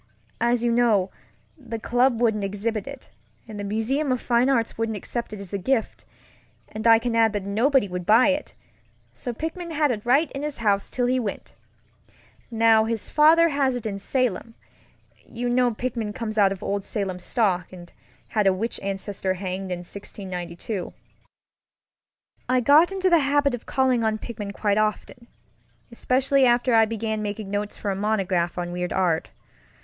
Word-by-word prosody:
As 235 0 +1
you 240 - +2
know, 225 -6 +2 0.4
the 240 -6 -7
club 245 +1 +1
wouldn't 220 -4 +1
exhibit 205 +4 -3
it, 275 -2 -10 0.4
and 215 -2 -8
the - - -4
Museum 230 +8 -1
of 255 - 0
Fine 240 +2 +2
Arts 235 -4 +1
wouldn't 225 -1 -2
accept 235 +4 -5
it 210 - -7
as 195 -2 -10
a 200 - -1
gift; 230 +4 -1 0.6
and 215 +2 -3
I 225 0 +8
can 230 0 -2
add 225 -1 +3
that 205 -2 -3
nobody 230 +4 +2
would 180 -1 -5
buy 225 +9 +5
it, 285 +1 -2 0.6
so 185 - -5
Pickman 325 +7 -5
had 300 -3 +1
it 210 -3 -4
right 275 +6 +2
in 275 - -5
his 300 -1 -3
house 205 -3 0
till 245 - -1
he 255 +1 +1
went. 210 -5 -5 1.0
Now 225 -1 +4
his 225 -1 -3
father 325 +2 +5
has 275 -3 +1
it 245 - -5
in 205 -2 -3
SalemŌĆöyou 230 0 -2 1.0
know 245 -2 +2
Pickman 230 -3 -3
comes 220 -2 -3
of 195 -2 +2
old 200 0 -2
Salem 195 -3 -3
stock, 185 -3 0
and 175 -2 -12 0.4
had 210 -3 +1
a 190 - +5
witch 225 +5 -3
ancestor 195 -1 -3
hanged 185 0 -5
in 175 0 -4
1692. 185 -1 -6 1.6
I 255 0 +3
got 295 +8 +5
into 380 -1 0
the 340 - +6
habit 285 -1 +2
of 245 - -6
calling 260 -3 +1
on 220 -1 +1
Pickman 210 -3 -6
quite 205 0 0
often, 215 +2 -2 0.6
especially 265 +3 +1
after 240 +1 +2
I 225 -1 +6
began 220 -1 -3
making 205 -1 -5
notes 205 0 -3
for 205 - -2
a - - -2
monograph 190 -4 0
on 175 0 -3
weird 180 0 -3
art. 175 -4 0
225 Hz, 170 wpm, -24 LUFS, 200-250 Hz, 1.6 s, I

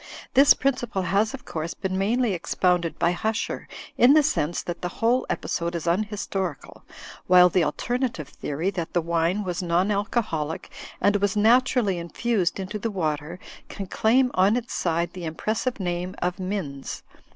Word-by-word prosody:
This 275 +2 +7
principle 245 -8 -1
has, 205 +6 +1
of 265 - -14
course, 160 +1 -4
been 190 -1 -3
mainly 225 +5 +1
expoimded 175 -1 0
by 170 +1 +2
Huscher 220 +5 -2 0.3
in 250 +3 +7
the 305 0 +6
sense 170 - 0
that 175 -1 -5
the 180 - -1
whole 240 +3 +2
episode 170 0 -2
is 170 - -4
un 175 +4 +2
historical, 195 - -4 0.5
while 180 0 +7
the 180 0 +2
alternative 235 - -2
theory, 155 +7 -3
that 175 -4 -5
the 175 - +2
wine 170 +4 0
was 180 -2 -3
non 180 +3 +1
alcoholic 200 -7 -2 0.3
and 205 0 +3
was 205 +1 0
naturally 230 -3 +3
infused 185 +2 -1
into 195 +3 -4
the 230 - -2
water, 160 -3 -2 0.3
can 200 - -6
claim 250 +7 +2
on 190 +4 +4
its 245 0 -5
side 170 0 -1
the 180 -2 -6
impressive 215 +9 -2
name 180 0 -3
of 180 +1 -2
Minns. 185 -8 -4
185 Hz, 160 wpm, -25 LUFS, 170-220 Hz, 0.5 s, This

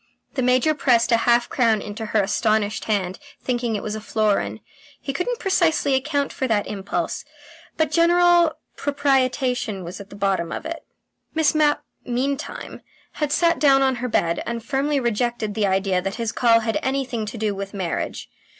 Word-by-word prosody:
The 260 - -1
Major 255 +5 +3
pressed 245 -6 +2
a 230 - +6
half 240 0 +4
crown 230 -4 +2
into 215 +2 -6
her 210 -1 +2
astonished 215 +1 0
hand, 190 -4 -1 0.2
thinking 240 -3 -1
it 205 - -3
was 210 - -3
a 215 - -5
florin. 205 - 0 0.4
He 275 - -4
couldn't 475 - -2
precisely 340 -8 +2
account 280 +1 0
for 260 - -2
that 215 -3 +1
impulse, 200 -1 -3 0.5
but 315 -2 +1
general 345 0 +4 0.2
propitiation 255 -7 0
was 175 +4 -7
at 200 - -12
the - - -11
bottom 195 -4 0
of - - -5
it. 330 0 -4 0.6
Miss 320 -2 +3
Mapp 300 -1 +2 0.2
meantime 270 +5 -3 0.4
had 295 -1 +1
sat 335 +2 +3
down 275 -2 +5
on 265 -2 +2
her 250 +1 -3
bed, 170 -5 +1
and 235 -1 -4
firmly 285 +2 0
rejected 235 -2 -1
the 210 -1 +1
idea 190 -1 +1
that 195 +1 -3
his 230 -2 -2
call 230 -2 +4
had 225 0 -1
anything 260 -5 -2
to 230 - -6
do 215 -1 0
with 195 +1 -6
marriage. 185 -4 -3
240 Hz, 175 wpm, -22 LUFS, 210-280 Hz, 0.6 s, a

